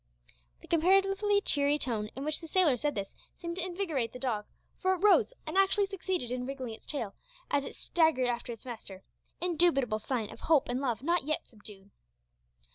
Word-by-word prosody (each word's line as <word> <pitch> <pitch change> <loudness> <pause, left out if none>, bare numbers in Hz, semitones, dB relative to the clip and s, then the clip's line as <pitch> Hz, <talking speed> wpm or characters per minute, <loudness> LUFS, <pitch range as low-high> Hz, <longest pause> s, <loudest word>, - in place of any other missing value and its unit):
The - - -14
comparatively 390 +4 +3
cheery 285 -4 +3
tone 220 -7 0
in 270 +3 -5
which 305 0 -1
the 330 - -8
sailor 330 -5 +4
said 290 +5 -1
this 195 -1 -4 0.2
seemed 340 0 -6
to 370 - -2
invigorate 340 - -2
the - - -6
dog, 235 -5 -2 0.3
for 375 0 +2
it 365 - -9
rose 420 +3 +5
and 315 +2 -5
actually 390 +1 +3
succeeded 375 - -3
in 250 0 -3
wriggling 260 -4 -5
its 220 - -13
tail 230 -9 -2 0.4
as 285 -1 +2
it - - -8
staggered 320 -6 +2
after 240 0 -2
its 230 0 -9
master 210 -6 -8 0.4
indubitable 315 -10 +2
sign 225 -1 -2
of - - -11
hope 310 -6 +3
and 250 +2 -1
love 245 -3 -1
not 340 -1 +1
yet 310 0 -1
subdued! 205 -3 -14
285 Hz, 190 wpm, -30 LUFS, 240-350 Hz, 0.4 s, rose